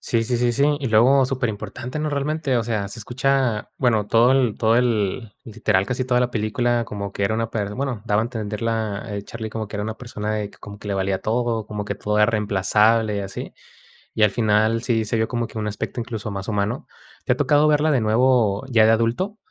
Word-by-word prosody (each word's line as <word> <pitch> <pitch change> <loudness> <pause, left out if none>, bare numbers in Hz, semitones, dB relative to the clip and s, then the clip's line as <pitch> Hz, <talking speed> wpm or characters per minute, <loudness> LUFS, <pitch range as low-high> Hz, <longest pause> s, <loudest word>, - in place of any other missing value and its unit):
Sí, 115 -1 0
sí, 120 +1 0
sí, 120 0 +1
sí. 145 +4 +2
Y 135 - -3
luego 125 +5 +5
superimportante, 125 +1 -4
¿no? 155 - -1
Realmente, 145 -1 -1
o 115 - +1
sea, 110 -3 -2
se 105 - -8
escucha 125 -1 0
bueno, 110 -5 +2
todo 115 +3 +4
el, 130 -5 +2
todo 115 0 +3
el, 115 -2 0
literal, 105 -4 0
casi 125 +1 -2
toda 125 -1 +2
la 125 0 +1
película, 120 +2 0
como 100 -2 -6
que 100 - -1
era 110 - +1
una 115 0 -2
per 105 -2 -3
bueno, 135 -4 -3
daba 105 0 +2
a - - -1
entender 110 -3 -5
la 110 -3 -2
el 100 0 -4
Charlie 110 -2 -6
como 110 -1 -4
que 100 - -11
era 105 - -2
una 110 +1 -4
persona 110 -3 -4
de 105 -1 -3
que - - -20
como 100 0 -10
que 105 - -11
le 100 - -1
valía 95 0 0
todo, 115 -1 -1
como 105 -1 -4
que - - -4
todo 105 0 -2
era 105 - +5
reemplazable, 105 +1 +2
y - - -1
así. 100 0 -6 0.6
Y 110 - +2
al 105 - +5
final 110 +1 +2
sí 115 -3 +1
se 110 +2 -1
vio 110 - +1
como 120 -2 -2
que 110 - -10
un 105 -1 -2
aspecto, 105 +3 -4
incluso, 110 -3 -5
más 100 +1 -5
humano. 105 -1 -2 0.4
¿Te - - +3
ha - - -8
tocado 150 +1 +3
verla 150 +1 +3
de 135 - +3
nuevo 110 -2 +2
ya 115 -3 +5
de 110 - +5
adulto, 120 - 0
110 Hz, 235 wpm, -22 LUFS, 105-125 Hz, 0.6 s, luego